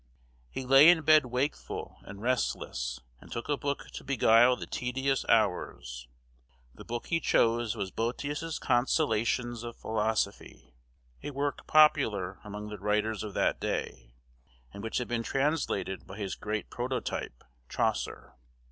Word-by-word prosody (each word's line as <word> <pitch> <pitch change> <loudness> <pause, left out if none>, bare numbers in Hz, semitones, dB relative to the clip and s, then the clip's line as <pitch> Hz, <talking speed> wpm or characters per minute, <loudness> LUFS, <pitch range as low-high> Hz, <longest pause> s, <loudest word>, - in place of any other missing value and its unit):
He 130 - -5
lay 135 +5 +8
in 170 -3 +5
bed 155 -3 +6
wakeful 125 +4 -3
and 100 +2 -10
restless, 65 - -1 0.2
and - - -16
took 115 - -4
a 145 - +1
book 140 0 -4
to - - -8
beguile 120 -2 +5
the - - -7
tedious 130 +2 -1
hours. 75 - 0 0.7
The - - -12
book 120 0 -5
he 165 - 0
chose 115 -5 +2
was 95 -4 -4
Boetius' 145 - -3
Consolations 120 -2 +1
of 120 -1 -7
Philosophy, 110 - -2 0.5
a - - -5
work 145 0 -3
popular 110 -12 +4
among 105 0 -7
the 105 -1 -7
writers 105 +2 0
of 105 -3 -6
that - - +1
day, - - -4 0.6
and 100 - -8
which 115 +1 -3
had 125 - -2
been 120 -1 -1
translated 135 -7 -1
by 95 - -9
his 100 -3 -3
great 105 0 -4
prototype, 125 - -4 0.3
Chaucer. - - -2
120 Hz, 140 wpm, -30 LUFS, 105-135 Hz, 0.7 s, lay